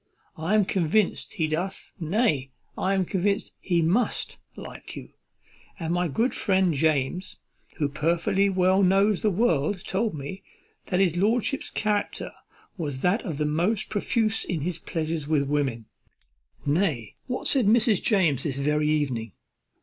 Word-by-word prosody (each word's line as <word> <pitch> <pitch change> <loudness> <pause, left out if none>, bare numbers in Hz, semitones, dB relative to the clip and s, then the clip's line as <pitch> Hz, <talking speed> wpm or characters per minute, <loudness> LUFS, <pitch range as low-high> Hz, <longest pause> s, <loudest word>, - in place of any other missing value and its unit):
"I 165 +7 0
am 210 -2 +4
convinced 185 +2 +1
he 160 - 0
doth, 170 +5 -3
nay, 160 - +1 0.3
I 195 +1 0
am 190 -1 +1
convinced 200 +2 0
he 170 -3 +1
must 195 +10 0 0.2
like - - -9
you; - - -8 0.7
and 165 -1 -2
my 175 0 +1
good 225 - 0
friend 190 -3 +2
James, 155 +4 0 0.4
who 145 - +1
perfectly 170 +7 +1
well 185 0 +3
knows 195 +1 +3
the 215 - +3
world, 185 -2 +1
told 205 0 -1
me, 145 +7 -6 0.5
that 180 - 0
his 180 -3 +2
lordship's 230 +7 +1
character 210 -1 -1 0.5
was 145 -5 -3
that 190 +6 +2
of 165 - -4
the 150 - 0
most 175 +8 0
profuse 220 +1 +1
in 165 -4 -3
his 170 +2 -3
pleasures 160 -2 -3
with 150 -2 +2
women; 135 -6 -1 0.8
nay, 145 - 0
what 250 -1 -3
said 260 -7 +3
Mrs. 220 -2 +4
James 175 - +2
this 140 -4 -2
very 150 +2 +1
evening? 130 -9 -1
180 Hz, 150 wpm, -26 LUFS, 150-200 Hz, 0.8 s, am